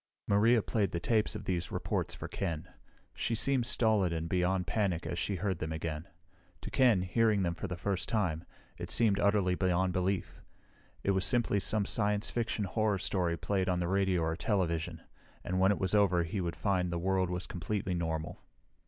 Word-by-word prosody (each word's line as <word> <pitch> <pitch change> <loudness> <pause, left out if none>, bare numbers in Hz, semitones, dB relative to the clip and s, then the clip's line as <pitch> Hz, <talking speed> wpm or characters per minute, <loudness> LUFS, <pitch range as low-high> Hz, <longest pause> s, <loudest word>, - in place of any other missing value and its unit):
Maria 110 +3 +4
played 105 -4 0
the 85 - -3
tapes 110 +4 +1
of - - -6
these 90 -2 -2
reports - - -2
for - - -6
Ken. 85 -3 -3 0.5
She 115 - -1
seemed 130 +1 +2
stolid 110 -7 +2
and 80 0 -2
beyond 90 +1 +1
panic 90 -2 -1
as 85 - -3
she 100 - -1
heard 95 -1 -2
them 80 -1 -3
again. 80 +1 -4 0.5
To - - -7
Ken, 120 -8 +4
hearing 105 +1 +2
them 85 -1 0
for 100 - -5
the 90 -1 -5
first 95 +1 -2
time, 95 -8 0 0.4
it - - -5
seemed 105 -4 +3
utterly 100 -3 +3
beyond 90 0 +1
belief. 95 +1 -2 0.6
It 100 - +2
was 95 -1 +1
simply 120 -5 +3
some 105 +1 +1
science 105 0 0
fiction 115 -3 -1
horror 105 +1 0
story 90 -3 -1
played 95 0 -1
on 90 - +1
the 85 - -1
radio 95 -1 +1
or 80 0 0
television, 85 -5 -1 0.4
and 90 0 -1
when 95 +1 +5
it 100 - 0
was 95 0 -1
over 95 -4 +4
he 90 +4 -3
would 85 -2 -3
find 90 -4 0
the 85 - -1
world 95 +1 +1
was 90 0 -3
completely 95 +1 -3
normal. 80 -2 -3
95 Hz, 190 wpm, -31 LUFS, 85-105 Hz, 0.6 s, when